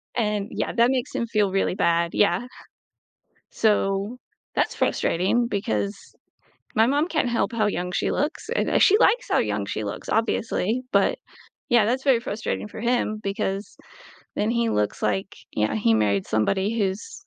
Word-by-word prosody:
and 210 Hz, -3 st, 0 dB
yeah, -, -, -2 dB
that 235 Hz, +2 st, +3 dB
makes 255 Hz, -2 st, -2 dB
him 235 Hz, -, -2 dB
feel 210 Hz, -3 st, +1 dB
really 195 Hz, -1 st, 0 dB
bad, 170 Hz, -2 st, +1 dB
yeah. 235 Hz, +4 st, +2 dB, 1.0 s
So, 205 Hz, +1 st, +1 dB, 0.4 s
that's -, -, 0 dB
frustrating 195 Hz, +8 st, +1 dB
because 105 Hz, -, -1 dB, 0.8 s
my 220 Hz, +1 st, +5 dB
mom 290 Hz, +6 st, +1 dB
can't 310 Hz, -8 st, 0 dB
help 235 Hz, -, 0 dB
how 215 Hz, -3 st, +1 dB
young 180 Hz, -2 st, -2 dB
she -, -, 0 dB
looks, 295 Hz, +4 st, -2 dB
and, -, -, +1 dB
eh, -, -, +2 dB
she 410 Hz, +2 st, +6 dB
likes -, -, +3 dB
how -, -, +3 dB
young -, -, -1 dB
she -, -, -4 dB
looks, -, -, -6 dB
obviously, 225 Hz, +1 st, 0 dB
but -, -, +3 dB, 0.5 s
yeah, 235 Hz, -3 st, +5 dB
that's 255 Hz, +4 st, 0 dB
very 265 Hz, -5 st, +4 dB
frustrating 215 Hz, -1 st, -4 dB
for 215 Hz, -, -9 dB
him 235 Hz, -3 st, 0 dB
because 195 Hz, 0 st, -3 dB, 0.6 s
then 210 Hz, -, +1 dB
he 235 Hz, -1 st, +1 dB
looks, 105 Hz, 0 st, -1 dB
like 100 Hz, -3 st, -1 dB, 0.2 s
yeah, 110 Hz, 0 st, 0 dB
he 115 Hz, +1 st, +3 dB
married 100 Hz, -3 st, +1 dB
somebody 190 Hz, -, 0 dB
who's 195 Hz, -1 st, -2 dB
210 Hz, 165 wpm, -24 LUFS, 190-240 Hz, 1.0 s, she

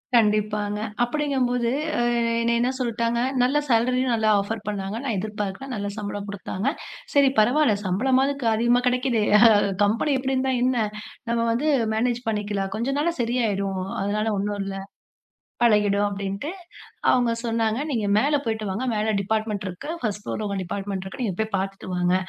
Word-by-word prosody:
கண்டிப்பாங்க. 210 Hz, -2 st, +2 dB, 0.2 s
அப்படிங்கும் 275 Hz, 0 st, 0 dB
போது 245 Hz, -1 st, 0 dB, 0.3 s
அ -, -, +1 dB, 0.4 s
என்ன 235 Hz, 0 st, +2 dB
என்ன 245 Hz, +1 st, +2 dB
சொல்லிட்டாங்க, 235 Hz, -1 st, 0 dB, 0.2 s
நல்ல 260 Hz, +4 st, +2 dB
சேலரி 250 Hz, +2 st, +3 dB
நல்ல 220 Hz, -1 st, 0 dB
ஆஃபர் 210 Hz, +2 st, -3 dB
பண்ணாங்க. 200 Hz, 0 st, -3 dB
நான் 245 Hz, -6 st, -1 dB
எதிர்பார்க்கலை. 210 Hz, +3 st, -4 dB
நல்ல 205 Hz, -1 st, -3 dB
சம்பளம் 205 Hz, -1 st, -4 dB
கொடுத்தாங்க. 200 Hz, +2 st, -4 dB, 0.5 s
சரி 280 Hz, -1 st, +5 dB
பரவாயில்லை. 240 Hz, 0 st, +4 dB
சம்பளமாவது 260 Hz, +9 st, +2 dB, 0.2 s
அதிகமா 240 Hz, +2 st, +3 dB
கிடைக்குதே. 250 Hz, -3 st, +1 dB, 0.6 s
கம்பெனி 230 Hz, +8 st, +1 dB
இப்படி 265 Hz, +1 st, -1 dB
இருந்தா 260 Hz, 0 st, +1 dB
என்ன? 245 Hz, -4 st, +2 dB, 0.4 s
நாம 230 Hz, 0 st, +1 dB
வந்து 265 Hz, +7 st, +1 dB, 0.3 s
மேனேஜ் 240 Hz, +2 st, 0 dB
பண்ணிக்கலாம். 205 Hz, -2 st, -2 dB
கொஞ்ச 255 Hz, +5 st, -1 dB
நாள்ல 335 Hz, +3 st, +1 dB
சரியாயிடும். 200 Hz, -6 st, -1 dB, 0.2 s
அதனால 205 Hz, +2 st, 0 dB
ஒன்னும் 205 Hz, +1 st, -2 dB
இல்ல. 195 Hz, 0 st, -5 dB, 0.9 s
பழகிடும் 205 Hz, -3 st, +4 dB
அப்படின்னு 200 Hz, +5 st, -4 dB, 0.6 s
அவங்க 245 Hz, -2 st, +3 dB
சொன்னாங்க. 225 Hz, -1 st, 0 dB
"நீங்க 225 Hz, -6 st, 0 dB
மேல 285 Hz, +7 st, +3 dB
போயிட்டு 220 Hz, -1 st, -2 dB
வாங்க. 210 Hz, +7 st, -2 dB
மேல 215 Hz, 0 st, 0 dB
டிபார்ட்மென்ட் 215 Hz, 0 st, -1 dB
இருக்கு. 180 Hz, +9 st, -7 dB
ஃபர்ஸ்ட் 210 Hz, -3 st, -2 dB
ஃப்ளோர் 215 Hz, -, -4 dB
உங்க 200 Hz, -1 st, -2 dB
டிபார்ட்மென்ட் 195 Hz, +1 st, -4 dB
இருக்கு. 190 Hz, +7 st, -8 dB
நீங்க 205 Hz, -6 st, -1 dB
போய் 220 Hz, 0 st, 0 dB
பாத்துட்டு 195 Hz, +1 st, -4 dB
வாங்க" 180 Hz, 0 st, +1 dB
220 Hz, 150 wpm, -24 LUFS, 205-245 Hz, 0.9 s, சரி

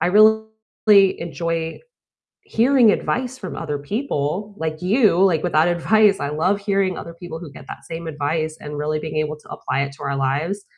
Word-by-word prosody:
I -, -, +2 dB
really 220 Hz, +3 st, +5 dB, 0.7 s
enjoy 165 Hz, -1 st, -3 dB, 0.6 s
hearing 245 Hz, 0 st, +4 dB
advice 255 Hz, +4 st, -1 dB
from 185 Hz, -6 st, -7 dB
other 150 Hz, -3 st, -3 dB
people, 200 Hz, -, -3 dB
like 160 Hz, +1 st, -4 dB
you, 210 Hz, +1 st, +3 dB
like, 180 Hz, -4 st, +3 dB
with 180 Hz, -, -1 dB
that 155 Hz, +2 st, +4 dB
advice, 200 Hz, +4 st, +3 dB
I 140 Hz, -, -3 dB
love 180 Hz, +7 st, +1 dB
hearing 195 Hz, -2 st, 0 dB
other 170 Hz, -, -8 dB
people 170 Hz, -1 st, -8 dB
who 160 Hz, -5 st, -10 dB
get -, -, -12 dB
that -, -, -9 dB
same 165 Hz, 0 st, -6 dB
advice 155 Hz, +1 st, -2 dB
and 150 Hz, 0 st, -7 dB
really 150 Hz, +1 st, -1 dB
being 155 Hz, 0 st, -6 dB
able 155 Hz, 0 st, -1 dB
to -, -, -20 dB
apply 140 Hz, +2 st, -2 dB
it 140 Hz, 0 st, -4 dB
to 140 Hz, -, -13 dB
our 140 Hz, 0 st, -2 dB
lives, 150 Hz, +10 st, -1 dB
165 Hz, 190 wpm, -21 LUFS, 155-200 Hz, 0.7 s, really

